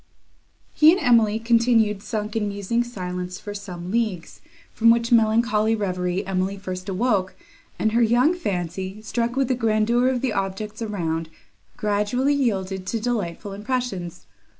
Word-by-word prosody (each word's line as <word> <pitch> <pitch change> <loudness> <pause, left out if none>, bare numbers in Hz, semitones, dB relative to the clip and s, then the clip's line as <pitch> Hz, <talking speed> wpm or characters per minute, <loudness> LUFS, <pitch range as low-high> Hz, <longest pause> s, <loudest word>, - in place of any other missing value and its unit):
He 310 +1 +7
and 370 - +2
Emily 230 - +4
continued 225 -3 +2
sunk 210 0 -4
in 215 -2 0
musing 205 +4 -1
silence 180 -5 -5
for 205 - -7
some 185 -3 -7
leagues, 215 -7 -2 0.3
from 230 0 +4
which 230 0 +3
melancholy 225 -1 +3
reverie 185 -2 -2
Emily 190 +1 -1
first 185 -1 -6
awoke, 195 -1 0 0.4
and 220 - +1
her 235 +2 +2
young 240 +8 +4
fancy, 190 - -4
struck 235 +2 -2
with 270 -1 +1
the 255 - +1
grandeur 230 +1 +2
of 255 -2 -1
the 255 -5 0
objects 205 +3 -3
around, 165 -7 -2 0.5
gradually 215 +5 +1
yielded 190 -8 -1
to 230 - -1
delightful 210 -4 -3
impressions. 205 -5 -4
215 Hz, 145 wpm, -23 LUFS, 190-235 Hz, 0.5 s, He